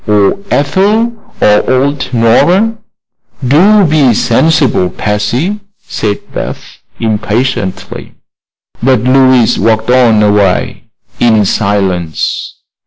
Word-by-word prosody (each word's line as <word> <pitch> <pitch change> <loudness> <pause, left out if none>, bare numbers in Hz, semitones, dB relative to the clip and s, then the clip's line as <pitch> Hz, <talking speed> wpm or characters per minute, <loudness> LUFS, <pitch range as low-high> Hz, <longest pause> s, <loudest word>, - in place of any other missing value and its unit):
Or 105 - +1
Ethel; 205 +11 +1 0.3
or 105 0 +2
old 135 +1 -1
Nora?" 175 - +2 0.7
"Do 195 +9 +4
be 145 -7 +2
sensible, 125 - +1
Patsy," 115 - -2 0.3
said 105 -2 -3 0.2
Beth, - - -7 0.2
impatiently. 110 -1 -3 0.7
But 130 -2 +2
Louise 130 -1 +3
walked 110 +1 0
on 120 -4 +3
a 105 - +3
way 100 -3 -1 0.3
in 110 -3 +2
silence. 95 -6 -2
120 Hz, 95 wpm, -10 LUFS, 105-145 Hz, 0.7 s, Do